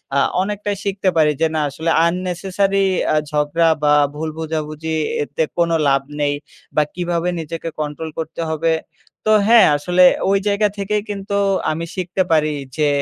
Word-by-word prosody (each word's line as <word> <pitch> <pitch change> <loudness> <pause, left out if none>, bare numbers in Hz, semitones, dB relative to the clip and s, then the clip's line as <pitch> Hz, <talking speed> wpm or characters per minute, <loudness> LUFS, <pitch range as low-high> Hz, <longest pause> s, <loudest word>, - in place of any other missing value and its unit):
আ - - +3 0.2
অনেকটাই 205 +1 -2
শিখতে 195 -1 0
পারি 150 -1 +4
যে 160 - +4
না - - +1
আসলে 160 +4 -3 0.2
unnecessary 185 +2 0 0.3
আ - - +2 0.2
ঝগড়া 150 +3 +2
বা 150 0 +4 0.2
ভুল 155 +1 -3
বোঝাবুঝি 160 0 -3 0.3
এতে 160 - -2
কোনো 170 -1 +2
লাভ 135 0 +3 0.2
নেই। 145 0 +1 0.4
বা 150 - +4
কীভাবে 175 0 -1
নিজেকে 165 +1 -5
কন্ট্রোল 150 +2 -4
করতে 160 +1 -5
হবে? 160 +1 0 0.5
তো 215 - +3 0.2
হ্যাঁ 235 0 +7
আসলে 180 +5 +3 0.3
ওই 200 - +4
জায়গা 205 +1 +2
থেকেই 205 +1 -1
কিন্তু 200 0 -4 0.4
আমি 165 +2 -3
শিখতে 185 0 -2
পারি 155 -1 +3 0.2
যে 150 -1 +2
165 Hz, 155 wpm, -19 LUFS, 155-195 Hz, 0.5 s, হ্যাঁ